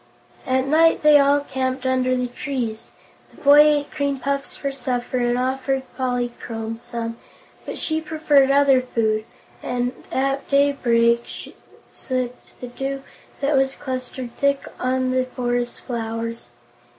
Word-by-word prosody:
At 260 0 +2
night 320 +4 +4
they 300 -1 +7
all 285 +1 +4
camped 260 -1 -3
underneath 255 -1 +1
the - - -24
trees. 240 -6 -4 0.4
The - - -19
boy 285 +1 +7
ate 295 -1 +4
cream 280 -2 -1
puffs 275 +1 -2
for 275 - -3
supper 255 -2 -2
and 240 0 +1
offered 265 +1 -1
Polychrome 240 -3 -3
some, 235 -1 -5 0.5
but - - -5
she 315 0 -1
preferred 300 -3 +3
other 275 -2 +5
food 220 -3 0 0.4
and 245 0 -1 0.2
at 275 +1 -1
daybreak 235 -5 +2 0.4
sipped 255 -1 -5
the 250 - -6
dew 270 +2 -4 0.4
that 285 +1 +2
was 270 0 +2
clustered 255 -2 -5
thick 280 0 +1
on 255 0 0
the 255 0 +1
forest 245 -1 -2
flowers. 230 -1 -4
260 Hz, 135 wpm, -22 LUFS, 245-280 Hz, 0.5 s, they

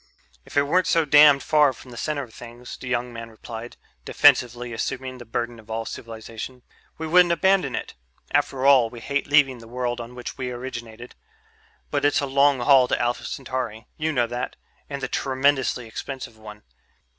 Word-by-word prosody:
"If - - -7
it 145 - +5
weren't 180 +6 +2
so 165 -1 +3
damned 145 -1 +7
far 150 -3 +4
from 125 +1 -14
the - - -10
center 145 +3 -2
of 115 -4 -13
things," 120 +2 -10
the 130 - -10
young 120 -1 -2
man 115 0 -7
replied, 115 +1 -9 0.3
defensively 120 - +3
assuming 130 +3 -4
the 120 - -10
burden 120 +1 -3
of 110 0 -17
all 115 0 -3
civilization, 115 +3 -8 0.3
"we 160 - -4
wouldn't 175 +2 +5
abandon 185 - +2
it. - - -5 0.4
After 130 0 +1
all, 130 -5 +6
we 120 - -10
hate 140 +4 -2
leaving 140 -4 +4
the 115 - -13
world 120 0 -3
on 120 +1 -10
which 125 - -7
we 125 -1 -2
originated. 120 -2 -7 0.8
But 145 -1 0
it's 145 - +3
a 140 - -1
long 140 -1 +3
haul 130 0 +6
to - - 0
Alpha 120 0 -1
Centauri 125 -5 -4
you 155 +1 -1
know 125 -5 +2
that 120 +1 -4 0.3
and 140 -1 -5
a - - 0
tremendously 130 -2 +1
expensive 130 +1 -7
one. 105 -1 -12
125 Hz, 185 wpm, -24 LUFS, 120-140 Hz, 0.8 s, damned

